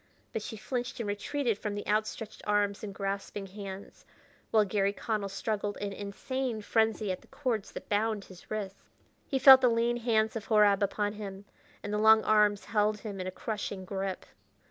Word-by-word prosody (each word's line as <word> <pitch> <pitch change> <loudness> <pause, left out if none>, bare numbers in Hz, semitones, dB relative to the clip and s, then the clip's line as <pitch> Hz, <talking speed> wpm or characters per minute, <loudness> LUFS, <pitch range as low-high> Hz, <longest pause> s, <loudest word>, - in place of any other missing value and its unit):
But 225 - -2
she 220 - -6
flinched 245 +3 -4
and 230 - -2
retreated 215 +3 -1
from 210 -1 -3
the 205 - -5
outstretched 215 +1 -2
arms 205 -1 +1
and 210 - -4
grasping 195 0 -4
hands, 195 0 -9 0.5
while 215 -1 +4
Garry 200 0 +1
Connell 210 -1 -2
struggled 205 +1 -2
in 200 -1 -4
insane 220 +3 -4
frenzy 220 -1 +1
at 185 - -4
the - - -21
cords 240 -7 -2
that - - -8
bound 210 0 0
his 185 -2 -15
wrists. 200 -3 -4 0.5
He 270 - 0
felt 265 0 +10
the 250 - +5
lean 235 +1 +1
hands 225 -2 +1
of 220 -1 -4
Horab 210 -3 +5
upon 205 +1 0
him, 200 -2 -7 0.4
and 205 - -4
the 210 - +1
long 220 0 +7
arms 210 -1 +3
held 210 -1 +1
him 200 -4 -5
in 185 - -4
a - - -3
crushing 205 -1 -4
grip. 190 0 -4
210 Hz, 185 wpm, -30 LUFS, 200-220 Hz, 0.5 s, felt